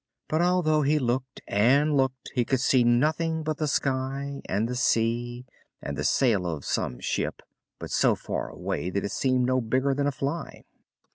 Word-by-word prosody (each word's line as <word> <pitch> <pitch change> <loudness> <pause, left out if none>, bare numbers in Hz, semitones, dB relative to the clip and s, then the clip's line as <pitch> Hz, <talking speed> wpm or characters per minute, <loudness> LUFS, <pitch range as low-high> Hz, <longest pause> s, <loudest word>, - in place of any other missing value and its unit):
But, 155 +2 +1
although 175 -4 +3
he 150 +2 +2
looked 130 -1 -2
and 140 +9 +3
looked, 130 -1 -1
he 125 - +2
could 130 +2 0
see 125 0 +3
nothing 155 +7 +1
but 155 -1 -2
the 155 - -1
sky, 135 0 -2
and 110 +3 0
the 125 - -3
sea, 120 0 0 0.3
and 70 - -5
the 70 - -3
sail 100 - +2
of 80 -5 -4
some 60 -1 -2
ship, - - -2 0.3
but - - -8
so - - +3
far - - -4
away 90 - -3
that 100 +2 -2
it 100 - -3
seemed 130 -2 +1
no 130 0 +2
bigger 130 +4 +1
than 140 +1 0
a - - +1
fly. 140 +5 -4
130 Hz, 185 wpm, -26 LUFS, 120-145 Hz, 0.3 s, although